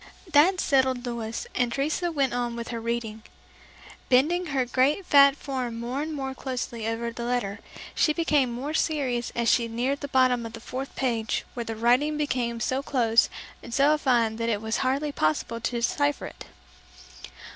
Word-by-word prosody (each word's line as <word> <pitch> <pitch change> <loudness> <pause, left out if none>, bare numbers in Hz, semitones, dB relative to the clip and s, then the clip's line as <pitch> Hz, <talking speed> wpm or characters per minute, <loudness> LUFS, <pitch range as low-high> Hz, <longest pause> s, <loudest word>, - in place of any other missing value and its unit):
That 340 +5 +5
settled 260 -4 +2
Louis, 230 -2 -4
and 245 -1 0
Teresa 310 +7 -1
went 275 -5 0
on 240 -1 -2
with 235 0 -6
her 230 -1 -4
reading. 230 -1 -3 0.9
Bending 330 +8 +3
her 270 -4 0
great 270 +9 +1
fat 280 -2 +6
form 255 -5 -4
more 245 +4 -3
and 315 +1 -3
more 270 -3 -4
closely 245 -4 -4
over 230 +1 -2
the 235 +1 -6
letter, 235 -4 -2 0.3
she 305 - +3
became 300 -5 +2
more 265 +6 -4
serious 265 -7 0
as 235 -1 0
she 235 0 +3
neared 250 +5 -1
the 285 - -4
bottom 255 -3 +3
of 230 -1 -7
the 230 - -8
fourth 260 +4 -6
page 230 -4 -1
where 240 -1 -4
the 225 - -4
writing 250 +7 +2
became 245 -6 -1
so 260 +4 -1
close 235 -5 +2 0.3
and 235 - -6
so 285 +3 +5
fine 235 -6 +1
that 230 0 -1
it 210 -3 0
was 220 +1 -2
hardly 275 +3 0
possible 225 - -1
to 230 - -1
decipher 285 +5 0
it. - - -10
250 Hz, 180 wpm, -26 LUFS, 235-280 Hz, 0.9 s, fat